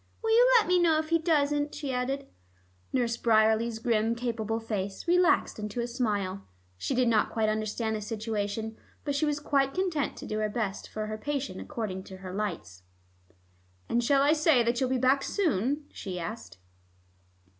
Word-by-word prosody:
"Will 450 - +1
you - - +6
let 440 - +3
me 360 0 +4
know 330 -3 +4
if 310 0 -2
he 330 0 +3
doesn't?" 295 -3 +1
she 285 -3 -3
added. 270 +2 -2 0.7
Nurse 235 -2 0
Bryerley's 220 0 +3
grim 225 0 +1
capable 225 -2 -2
face 205 - -4
relaxed 355 -8 +3
into 210 +2 -4
a 235 - 0
smile. 205 -6 -2 0.3
She 175 - -2
did 250 -1 +3
not 225 -2 +3
quite 220 -1 0
understand 215 +1 -1
the 215 - -4
situation, 220 0 -3 0.3
but 285 - -1
she 300 +2 +1
was 295 0 0
quite 275 -2 +1
content 355 -7 -1
to - - -8
do 215 - -3
her 215 0 0
best 205 -3 -3
for 215 0 -4
her 215 0 -5
patient 275 -7 -3
according 200 -5 -4
to 190 - -10
her 185 -1 -8
lights. 140 - -4 1.1
"And 240 +1 +1
shall 275 +3 +4
I 290 +2 +5
say 305 -5 +4
that 235 +1 0
you'll 260 - +1
be 260 - +1
back 260 +2 +3
soon?" 290 - 0
she 185 -2 -6
asked. 175 - -7
235 Hz, 180 wpm, -28 LUFS, 215-285 Hz, 1.1 s, you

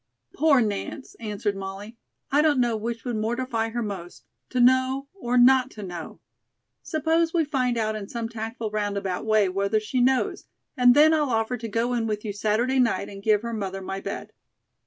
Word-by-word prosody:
"Poor 290 -5 +4
Nance," 215 +6 -3
answered 210 -2 -2
Molly. 195 +3 -7 0.4
"I 285 +2 +4
don't 300 -3 +3
know 240 -2 +2
which 230 +2 -4
would 240 -3 -2
mortify 230 +1 -1
her 235 +1 -3
most: 190 -4 -7 0.2
to 255 - -2
know 260 +2 +3
or 250 -11 -1
not 255 +1 +6
to 210 - -6
know. 175 -3 -7 0.6
Suppose 325 +2 0
we 325 -2 +3
find 255 -4 0
out 215 -1 0
in 205 -2 -6
some 230 -1 -3
tactful 225 0 -5
roundabout 200 -2 -2
way 215 -2 +4
whether 200 +3 0
she 215 +4 -1
knows, 260 +1 +1 0.3
and 250 -2 +6
then 310 +2 +6
I'll 300 -3 +1
offer 225 +1 0
to 230 -1 -6
go 230 +3 -1
in 230 -2 0
with 210 0 -3
you 205 - -3
Saturday 220 +6 +1
night 225 -5 +1
and 195 -1 -9
give 210 0 +2
her 235 0 -4
mother 195 -3 -3
my 195 +1 -4
bed." - - -6
230 Hz, 190 wpm, -25 LUFS, 210-255 Hz, 0.6 s, not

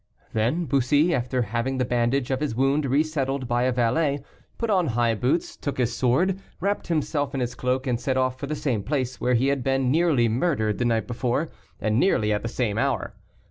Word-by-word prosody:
Then 120 +11 +1
Bussy, 145 +5 +2
after 125 -1 0
having 115 +5 -2
the 125 - +1
bandage 125 +3 0
of 130 - 0
his 145 -6 -2
wound 135 +3 +2
resettled 140 -2 0
by 120 +1 +1
a 130 - +2
valet, 135 +4 +1 0.3
put 230 -2 -1
on 185 -4 +2
high 120 -1 +1
boots, 130 +10 0
took 145 - -4
his 120 -2 0
sword, 175 +10 +2 0.2
wrapped 200 +3 -1
himself 145 -4 -1
in - - -1
his 125 -1 -2
cloak, 130 +2 -1
and 125 -3 0
set 130 -1 0
off 130 0 0
for 140 - -4
the 155 - -2
same 140 -8 -1
place 130 +1 -2
where 125 0 +2
he 130 +4 +2
had 140 -2 0
been 135 -1 +1
nearly 155 -6 +3
murdered 115 -3 0
the 125 - +1
night 115 -2 +1
before, 125 +6 -1 0.3
and 110 +1 +1
nearly 105 - +2
at 105 - -1
the 115 - -3
same 115 -3 -1
hour. 135 -5 -1
130 Hz, 210 wpm, -25 LUFS, 120-145 Hz, 0.3 s, nearly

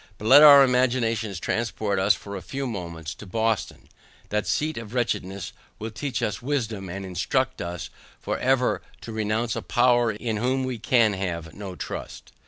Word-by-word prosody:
But 105 - -9
let 140 +4 +9
our 145 -2 +10
imaginations 120 -6 +1
transport 110 -2 -1
us 100 +1 +4
for 100 0 -8
a 95 - -5
few 135 +10 -5
moments 85 - -5
to 105 - -12
Boston, 110 +1 -1 0.4
that 105 0 -1
seat 155 +1 0
of 115 0 -7
wretchedness 100 -6 -2 0.2
will 110 +1 -6
teach 130 +2 -3
us 105 - -2
wisdom, 115 -8 -2
and 95 +2 -5
instruct 90 -3 -1
us 85 -2 -5 0.3
for - - -3
ever 130 -1 +2 0.2
to 115 - -8
renounce 110 +1 -1
a - - -3
power 120 -1 +3
in 110 +1 -3
whom 130 +4 0
we 130 -3 -3
can 115 -2 +3
have 85 -4 -4
no 100 -3 -7
trust. - - -7
110 Hz, 175 wpm, -25 LUFS, 100-125 Hz, 0.4 s, our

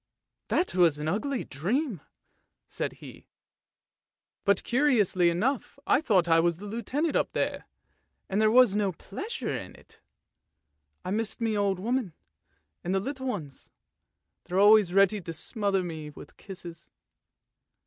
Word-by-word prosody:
" - - -60
That 365 - +1
was 170 -5 +4
an 150 +1 -4
ugly 225 - -1
dream! 205 - -2 0.3
" - - -44 0.3
said - - -4
he; - - -13 0.6
" - - -61
but 200 -1 +3
curiously 235 -10 +3
enough 235 +12 -1
I - - +3
thought 190 - +2
I 165 0 +5
was 170 0 +1
the 200 - -9
Lieutenant 255 +9 -2
up - - 0
there, - - -2 0.6
and 195 +3 0
there 215 - +5
was 240 -3 +5
no 200 -3 +1
pleasure 260 - -5
in 90 - -7
it. - - -20 1.0
I 185 - -3
missed 220 +1 -2
my 225 -2 0
old 200 -2 +1
woman 235 -3 -1 0.7
and 185 +2 -1
the - - +3
little 265 +5 -5
ones; 155 - -6 0.8
they're 180 +1 -3
always 205 -2 +6
ready 195 +2 +3
to 165 -1 -6
smother 195 +3 -1
me 160 -3 -6
with 150 - -13
kisses." 175 -4 -10
200 Hz, 150 wpm, -28 LUFS, 175-235 Hz, 1.0 s, always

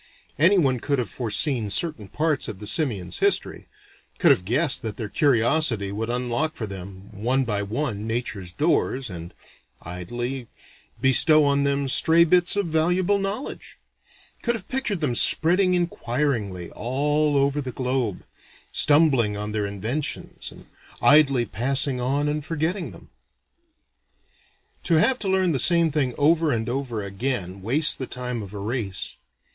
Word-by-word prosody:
Anyone 155 -7 +3
could 140 +3 -1
have 120 -7 -3
foreseen 120 0 0
certain 110 - +1
parts 155 +4 -1
of 95 - -6
the 105 - -8
simians' 105 - 0
history: - - +1 0.5
could - - +4
have 90 - +1
guessed 135 - +2
that 110 -2 -6
their 110 - -5
curiosity 120 -5 +1
would 110 +3 -4
unlock 125 +5 -1
for 110 - -5
them, 95 0 -10
one 120 +6 -1
by 105 -3 -1
one, 110 0 -4
nature's 110 -6 -4
doors, 135 - -1
and 85 -1 -8 0.5
idly 120 +9 -5 0.5
bestow 150 +3 +5
on 140 0 +1
them 140 0 0
stray 160 +5 +4
bits 175 +2 +3
of 205 -1 0
valuable 175 +5 +1
knowledge: 200 +7 -6 0.6
could 235 -1 0
have 200 -4 -8
pictured 245 -9 -2
them 140 -5 0
spreading 180 +9 +5
inquiringly 120 - -2
all 145 +5 -1
over 140 +1 +1
the 130 -2 -6
globe, 125 -4 -3 0.5
stumbling 140 -9 +3
on 105 +1 -4
their 105 -1 -2
inventions 110 +9 -5
and - - -15 0.3
idly 140 -4 +4
passing 125 +5 0
on 140 +4 -1
and 150 0 -2
forgetting 165 +4 -3
them. - - -15 1.7
To 170 - +2
have 250 +11 +3
to 205 - -4
learn 190 -2 +1
the 135 - -1
same 165 +1 +3
thing 135 -5 -1
over 155 +1 +2
and 115 -1 -2
over 120 -4 -4
again 100 -2 -4
wastes 140 +10 +4
the 130 - -6
time 125 -2 -4
of 100 0 -10
a - - -6
race. 105 -2 -4
130 Hz, 150 wpm, -23 LUFS, 110-155 Hz, 1.7 s, bestow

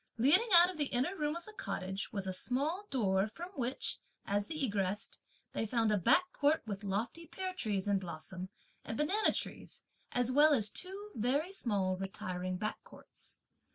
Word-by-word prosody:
Leading 305 - +5
out 345 +1 +9
of 335 - -11
the 290 - +2
inner 265 +10 0
room 300 -2 -1
of 340 - -7
the 430 - -11
cottage 195 - -4
was 200 -4 -2
a 190 - -2
small 290 - 0
door 195 -6 +2
from 345 +11 -8
which, 260 -7 -2 0.3
as 205 0 0
they 320 - -5
egressed, 205 -7 -1 0.3
they 225 - -1
found 225 -1 +2
a 210 - +3
back 360 - +4
court 295 +2 +2
with 205 -2 -5
lofty 220 - -3
pear 370 +3 -4
trees 205 - -1
in 200 -1 +3
blossom 180 +1 -6 0.3
and 225 - -4
banana 390 +9 +3
trees, - - -5 0.3
as 245 0 +1
well 295 +3 +6
as 215 -5 0
two 395 +3 -5
very 275 - 0
small 200 - 0
retiring 185 -1 -4
back 215 +3 -3
courts. - - -14
240 Hz, 180 wpm, -34 LUFS, 195-325 Hz, 0.3 s, out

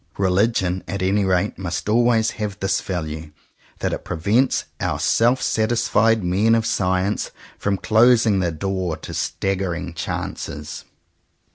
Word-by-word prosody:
Religion 95 -1 +1
at 100 -1 -3
any 100 +2 +2
rate 95 +1 0
must 90 0 -4
always 115 0 +3
have 105 -3 -4
this 95 +1 0
value, 80 -4 -5 0.5
that - - 0
it - - -4
prevents 105 +10 +1
our - - -1
self 120 +3 +3
satisfied 110 -1 +2
men 100 +6 +3
of 115 -1 +1
science 95 +1 0 0.3
from 100 -1 0
closing 110 0 +4
the 90 -2 0
door 90 0 -2
to - - -9
staggering 90 -3 -2
chances. 75 -2 -5
95 Hz, 130 wpm, -22 LUFS, 90-110 Hz, 0.5 s, closing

